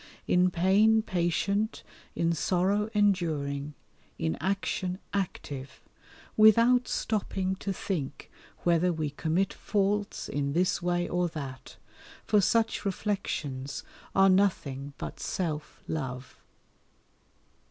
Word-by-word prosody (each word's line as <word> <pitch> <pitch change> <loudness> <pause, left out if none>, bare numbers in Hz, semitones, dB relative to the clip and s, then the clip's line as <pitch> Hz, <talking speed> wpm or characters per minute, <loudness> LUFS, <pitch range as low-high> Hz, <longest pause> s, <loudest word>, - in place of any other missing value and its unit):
In 180 +1 +4
pain 200 +6 +4
patient, 195 +4 0 0.3
in 170 0 +1
sorrow 195 +5 +1
enduring, 150 -8 +1 0.4
in 80 0 -1
action 190 -1 -1 0.2
active, 145 -8 -4 0.6
without 230 +4 +6
stopping 190 -3 -1
to 200 - -3
think 170 -7 -4 0.3
whether 175 +1 +3
we 155 -3 -2
commit 165 +6 0
faults 205 0 -1
in 140 0 -2
this 180 +2 +1
way 175 0 0
or 175 0 +1
that, 140 -5 -7 0.5
for 210 - +4
such 225 +3 +2
reflections 160 -9 -3 0.3
are 195 0 +6
nothing 145 -8 +1
but - - -6
self 155 -4 -3
love. 130 -4 -5
180 Hz, 100 wpm, -29 LUFS, 150-200 Hz, 0.6 s, without